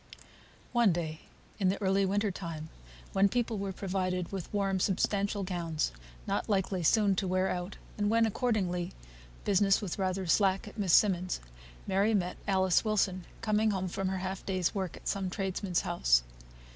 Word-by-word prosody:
One 235 -5 +4
day, 160 -2 -3 0.4
in 190 -2 +3
the 195 - -1
early 195 -1 +2
winter 205 +1 +1
time, 165 -4 -6 0.4
when 195 +1 +4
people 235 -1 -1
were 195 0 -2
provided 185 -2 -2
with 190 -4 -5
warm 195 -2 0
substantial 200 +1 0
gowns, 170 -4 -1 0.3
not - - -2
likely 190 -2 +1
soon 200 +4 +4
to 190 - 0
wear 185 +1 +1
out, 180 +2 -4 0.2
and 205 0 +2
when, 230 +1 +4
accordingly, 195 -7 -1 0.5
business 195 0 +4
was 200 -2 -4
rather 190 0 -1
slack 195 +3 +2
at 210 - -10
Miss 195 -4 +1
Simmonds', 185 -3 +3 0.5
Mary 200 +3 +2
met 180 -2 -1
Alice 190 -2 +3
Wilson, 195 -4 0 0.2
coming 215 -1 +2
home 190 -2 -1
from 190 +2 -2
her 190 0 -1
half 190 +1 -4
day's 185 -3 0
work 190 -4 -3
at - - -10
some 195 -2 -1
tradesman's 190 -1 -1
house. - - +3
190 Hz, 165 wpm, -31 LUFS, 180-205 Hz, 0.5 s, One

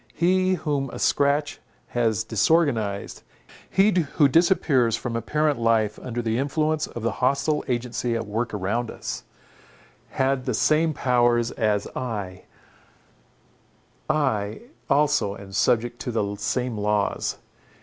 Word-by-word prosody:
He 185 +2 +2
whom 145 -5 -2
a - - -8
scratch 145 +1 +1 0.3
has 115 -3 0
disorganized, 110 -4 +1 0.5
he 195 +3 +4 0.2
who 145 - +5
disappears 140 - +3
from 115 0 -4
apparent 145 +5 0
life 110 -2 +1
under 120 -1 -4
the 115 +1 0
influence 155 +2 0
of 120 - -8
the 115 - +1
hostile 150 +2 +1
agency 120 -1 -2
at 115 - -2
work 115 +2 -2
around 105 +4 -2
us, - - -6 0.8
had 130 -1 0
the 125 -4 -1
same 155 +6 +2
powers 120 -2 +2
as 105 -3 0
I—I 115 -5 -2 2.7
also 145 -9 +2
am 100 -1 -11
subject 120 +3 +1
to 125 - -4
the 105 -3 -1
same 125 0 -2
laws. 105 0 0
120 Hz, 120 wpm, -24 LUFS, 110-145 Hz, 2.7 s, who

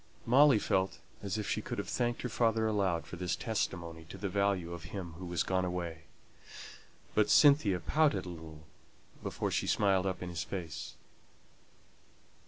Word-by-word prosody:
Molly 140 +2 +6
felt 95 -2 0 0.2
as 100 0 -2
if 105 - -3
she - - -1
could - - -5
have - - -3
thanked 120 -1 -1
her - - 0
father 115 -1 +1
aloud 100 -6 +1
for 90 - -8
this 90 0 -1
testimony 85 -8 -3
to 90 - -10
the 100 +1 -3
value 95 -3 0
of 85 0 -8
him 90 -3 -6
who 90 - -6
was 85 -1 0
gone 95 -1 0
away. 85 -3 -4 1.1
But 105 - +3
Cynthia 140 -11 +6
pouted 105 - +2
a - - -6
little 80 -2 -10 0.6
before - - -3
she - - 0
smiled 95 -2 +2
up 95 -1 -3
in 90 - -5
his 85 -4 -3
face. 85 -3 -6
95 Hz, 170 wpm, -32 LUFS, 85-105 Hz, 1.1 s, Molly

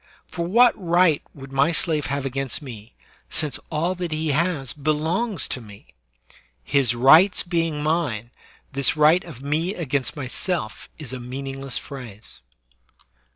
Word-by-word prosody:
For 170 -1 -4
what 235 +6 +6
right 175 -3 +4
would 135 -1 -11
my 140 +4 +3
slave 160 -3 0
have 140 -1 -2
against 135 -1 -1
me, 115 -6 -10 0.3
since 145 -3 -1
all 165 +3 0
that 180 -2 -4
he 155 0 -1
has 150 -3 0
belongs 160 - 0
to 125 - -2
me? 105 -3 -14 0.7
His 125 - +1
rights 155 +10 +6
being 165 -4 -1
mine, 145 -8 -1 0.4
this 140 +2 +1
right 155 +4 +5
of 145 -6 -11
mc 160 +7 -1
against 140 -3 -1
myself 145 - -3
is 145 -5 -8
a 130 - -5
meaningless 135 +1 -5
phrase. 120 -6 -9
150 Hz, 140 wpm, -23 LUFS, 135-170 Hz, 0.7 s, what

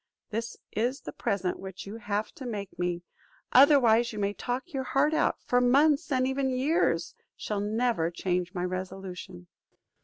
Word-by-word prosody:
This 230 +1 -3
is 245 +5 -1
the - - -7
present 185 -2 -1
which 190 -1 -8
you 205 +3 -7
have 210 -1 -2
to 260 - -8
make 200 -6 -6
me; 175 -1 -1 0.5
otherwise 245 -4 +6
you 215 - -8
may 200 0 0
talk 255 +10 -4
your 270 - -1
heart 280 +4 +2
out, 315 - +1
for 245 0 +2
months 285 +5 +4
and 255 -1 +2
even 265 0 0
years 255 - +1 0.2
shall 210 -1 -3
never 215 -4 +1
change 180 0 -1
my 180 0 -1
resolution." 185 - -6
225 Hz, 160 wpm, -28 LUFS, 190-260 Hz, 0.5 s, otherwise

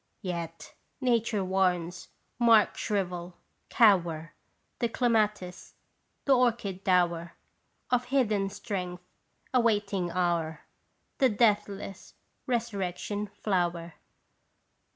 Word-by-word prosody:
Yet, 170 -3 -5 0.3
Nature 230 -6 +1
warns, 180 -2 0 0.3
mark 230 -3 +5
shrivel, 180 -4 -3 0.3
cower, 170 -7 +3 0.5
The 235 - +1
clematis; 210 -7 0 0.5
the 275 - +5
orchid 230 -6 0
dower 175 -2 +1 0.6
Of 250 0 +2
hidden 215 -8 +1
strength 180 -4 -5 0.5
awaiting 205 -7 +1
hour; 170 -3 -1 0.6
The 265 - +5
deathless 205 -3 0 0.3
resurrection 205 -3 -2
flower 175 -4 -2
195 Hz, 80 wpm, -29 LUFS, 175-225 Hz, 0.6 s, mark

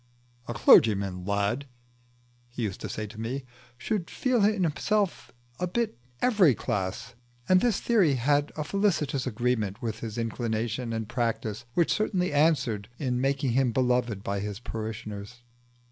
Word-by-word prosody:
"A 120 - -4
clergyman, 100 -4 +5
lad," 100 +7 0 0.8
he 120 0 -5
used 100 -4 -3
to - - -4
say 110 - -4
to 110 +1 -9
me, 130 +4 -3 0.3
"should 175 - -2
feel 250 -5 +1
in 205 -2 +3
himself 195 +5 0 0.3
a 180 - 0
bit 230 +5 0
of - - -29 0.3
every 200 - +5
class;" 105 +6 -3 0.3
and 185 0 +5
this 235 -5 +2
theory 195 - +3
had 145 +4 +1
a 150 - -2
felicitous 155 -7 0
agreement 110 -4 -1
with 110 -2 -3
his 115 -1 -6
inclination 115 +1 -2
and 110 -1 -3
practice, 115 -1 -2
which 170 -2 +3
certainly 185 -6 0
answered 140 -9 +2
in 125 -3 -1
making 135 -1 +1
him 130 0 +2
beloved 125 -4 +1
by 100 0 -2
his 100 0 -4
parishioners. 110 0 -6
120 Hz, 150 wpm, -27 LUFS, 110-155 Hz, 0.8 s, clergyman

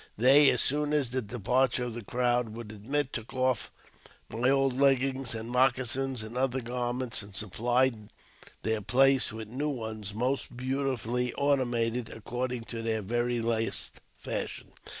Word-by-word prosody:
They, 135 +5 +7
as - - +3
soon 150 +2 +1
as 140 -5 +1
the 130 0 0
departure 125 +3 +1
of 120 -2 -4
the 120 0 -7
crowd 120 +1 0
would 115 -2 -8
admit, 130 +7 -2
took 110 +1 -6
off 130 -2 0 0.6
my 120 +3 +1
old 135 -1 +3
leggings, 135 -2 +2
and 110 0 -5
moccasins, 130 0 +1
and 110 +2 -8
other 130 0 +1
garments, 125 0 -1
and 100 -1 -10
supplied 115 +2 0 0.5
their 110 -1 0
place 130 +5 +4
with 110 0 -7
new 135 +7 -2
ones, 110 -6 -5
most 125 +1 -2
beautifully 125 -2 -1
ornamented 125 -4 0
according 125 +2 -4
to 115 0 -6
their 110 -2 -1
very 120 +3 0
last 115 -1 -1 0.2
fashion. - - -5
125 Hz, 150 wpm, -29 LUFS, 115-130 Hz, 0.6 s, They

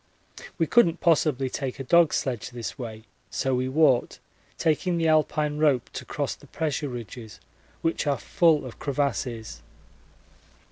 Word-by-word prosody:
We 165 - +2
couldn't 175 -3 +4
possibly 150 -5 +2
take 130 +1 -4
a - - -3
dog 170 +3 +5
sledge 125 -5 -2
this 120 -2 -6
way, 110 -5 -7 0.3
so 135 -1 -1
we 130 +1 0
walked, 135 -3 +3 0.4
taking 170 +2 +1
the 165 -1 +1
Alpine 150 -1 +1
rope 140 -6 +2
to - - -6
cross - - -2
the - - -16
pressure 150 -2 -2
ridges, 120 -2 -8 0.4
which 165 -2 0
are 140 -1 +2
full 160 -5 +2
of 125 - -10
crevasses. 125 -5 -2
140 Hz, 145 wpm, -26 LUFS, 125-160 Hz, 0.4 s, dog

